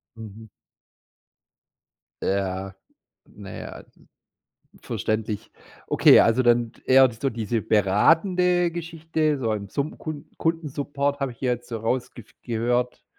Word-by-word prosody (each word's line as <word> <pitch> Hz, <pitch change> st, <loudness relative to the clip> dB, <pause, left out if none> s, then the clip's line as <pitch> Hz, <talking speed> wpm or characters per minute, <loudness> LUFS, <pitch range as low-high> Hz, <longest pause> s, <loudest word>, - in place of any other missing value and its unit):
Mhm. 110 Hz, 0 st, -11 dB, 1.7 s
Ja. 95 Hz, 0 st, -2 dB, 0.5 s
Naja, -, -, -10 dB, 1.0 s
verständlich. 110 Hz, -1 st, -3 dB, 0.4 s
Okay, -, -, +6 dB
also 115 Hz, +3 st, +3 dB
dann 120 Hz, -1 st, +2 dB
eher 130 Hz, 0 st, +6 dB
so 130 Hz, +5 st, -2 dB
diese 115 Hz, 0 st, -2 dB
beratende 170 Hz, -, +3 dB
Geschichte. 160 Hz, -2 st, -2 dB
So 115 Hz, -4 st, -1 dB
im 100 Hz, -2 st, -4 dB
Summ 140 Hz, +9 st, -3 dB
Kund 155 Hz, -2 st, -7 dB
Kundensupport, 145 Hz, -3 st, -2 dB
habe 135 Hz, -2 st, -2 dB
ich 120 Hz, -, -20 dB
hier 125 Hz, -2 st, 0 dB
jetzt 120 Hz, 0 st, -6 dB
so 115 Hz, -2 st, -4 dB
rausgef 120 Hz, 0 st, -3 dB
gehört. 120 Hz, +1 st, -1 dB
125 Hz, 110 wpm, -24 LUFS, 110-150 Hz, 1.7 s, Okay